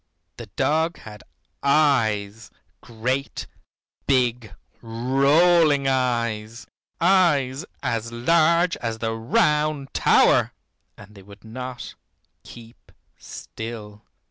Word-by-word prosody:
The - - -9
dog 160 +3 0
had 105 -1 -12 0.4
eyes, 115 -8 +1 0.3
great 125 +4 -4 0.6
big 120 -6 0 0.3
rolling 140 +6 +2
eyes, 115 -4 -2 0.3
eyes 150 -6 +2 0.2
as 115 0 -3
large 165 +7 +2
as 115 -2 -4
the 115 0 -3
Round 145 +5 0
Tower. - - +3 0.4
And 100 +1 -15
they 100 - -14
would 100 +1 -16
not 125 +2 -8 0.5
keep 115 0 -15 0.2
still. 110 -2 -9
125 Hz, 90 wpm, -23 LUFS, 110-145 Hz, 0.6 s, Tower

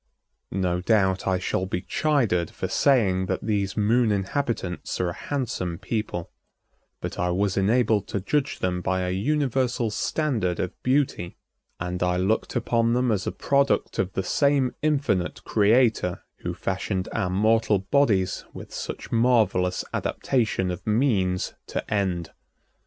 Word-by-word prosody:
No 90 -2 0
doubt 95 -2 +2
I 95 -1 +2
shall 95 0 -1
be 90 -1 -3
chided 120 - +1
for - - -4
saying 95 -9 +2
that 95 - -2
these 100 -2 -1
Moon 110 +2 +3
inhabitants 100 -2 -2
are 90 - +1
a - - -4
handsome 115 -12 -3
people, 100 -3 -3 0.7
but - - -5
I 90 - +1
was 95 +2 0
enabled 105 0 +2
to 100 - -2
judge 140 +9 -1
them 90 -1 -1
by 95 +1 0
a 90 - -1
universal 130 +1 0
standard 110 - -1
of 90 - -2
beauty, 130 -10 0 0.4
and 90 0 -3
I 90 0 +2
looked 95 +5 0
upon 115 0 +1
them 125 0 +2
as 100 -3 -1
a - - 0
product 140 0 +1
of 95 0 0
the 95 - -1
same 140 +1 +2
infinite 135 -12 0
Creator 110 -4 +2
who - - -5
fashioned 95 -1 -2
our 100 -5 0
mortal 110 +2 +3
bodies 95 -3 +1
with - - -9
such - - -6
marvelous 115 -6 +2
adaptation 110 -7 0
of 90 - -7
means 105 -6 +1
to - - -3
end. 90 -5 -1
100 Hz, 145 wpm, -25 LUFS, 90-125 Hz, 0.7 s, Moon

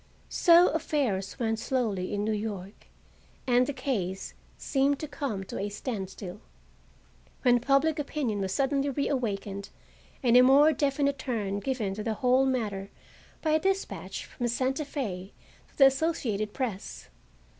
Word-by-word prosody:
So 345 0 +6
affairs 270 -11 -1
went 225 -2 -1
slowly 225 -7 -1
in 205 0 -1
New 220 - 0
York 205 -2 -5 0.6
and 250 0 +3
the - - -1
case 220 -9 -3 0.2
seemed 275 +1 +1
to 310 - -5
come 275 -9 -3
to - - -6
a 200 +1 -2
standstill, 200 -3 -6 1.0
when 245 -2 +5
public 280 +5 +2
opinion 275 -8 -2
was 190 -1 -2
suddenly 275 +4 +1
reawakened 215 -8 -2 0.5
and 240 -2 +4
a 250 - +9
more 280 +5 +6
definite 280 0 0
turn 210 -6 -2
given 225 -5 -2
to 210 - -5
the 220 0 -2
whole 260 +1 +3
matter 205 -7 -2 0.5
by 315 - +1
a 310 - +4
despatch 390 +3 -2
from 245 - -4
Santa 260 +5 -1
Fe 200 -10 -5 0.4
to - - -28
the 275 - +8
Associated 265 -8 +1
Press. 225 -7 -5
250 Hz, 145 wpm, -28 LUFS, 205-280 Hz, 1.0 s, a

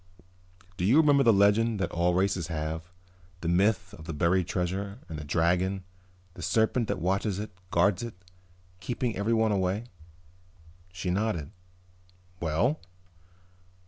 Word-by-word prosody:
"Do - - -2
you 120 +9 +5
remember 145 -3 +5
the 120 -4 +6
legend 105 +2 +3
that 95 - -1
all 85 +1 +1
races 95 -3 +1
have, 80 +1 -4 0.5
the 85 - -3
myth 90 +1 +2
of 80 - -10
the 80 - -5
buried 85 +3 +2
treasure, 95 +3 -2
and 80 -2 -6
the - - -6
dragon, 90 +5 +1 0.5
the - - -10
serpent 110 +1 +1
that - - -1
watches 95 +2 0
it, 105 +1 -5 0.2
guards 90 +4 +2
it, 120 -4 -6 0.6
keeping 120 +4 -2
everyone 110 +2 +2
away?" 95 +2 0 1.1
She 90 0 -3
nodded. 95 -6 -1 0.9
"Well?" 85 - +1
95 Hz, 135 wpm, -28 LUFS, 85-110 Hz, 1.1 s, the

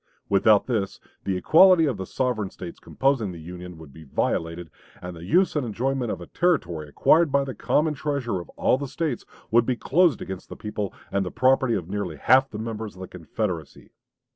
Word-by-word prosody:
Without 100 +1 +4
this, 110 -6 -2 0.3
the 95 -2 0
equality 170 - +6
of 135 -8 -1
the 95 -1 -6
sovereign 120 -6 -1
States 90 -2 -9
composing 135 -7 0
the 85 - -9
Union 90 +1 -9
would 80 -4 -13
be 80 - -12
violated, 80 +3 -2 0.3
and 90 0 -7
the 85 - -10
use 175 - +2
and 150 - +1
enjoyment 125 +2 -1
of - - -4
a - - -8
territory 90 - 0
acquired 160 - +4
by 140 0 +3
the 135 -1 -5
common 155 +4 +1
treasure 140 -8 -2
of 85 - -13
all 130 - +2
the 140 - -4
States 150 -3 -3 0.3
would 115 +1 +4
be 130 - +1
closed 165 - +2
against 95 -1 -7
the - - -7
people 105 -2 -4 0.2
and 100 0 +1
the 90 - -4
property 130 0 +2
of 90 -4 -3
nearly 95 -4 -3
half 130 - +4
the 105 - -7
members 110 -1 -5
of 95 - -11
the 95 - -6
Confederacy. 85 -1 -5
110 Hz, 200 wpm, -25 LUFS, 90-135 Hz, 0.3 s, equality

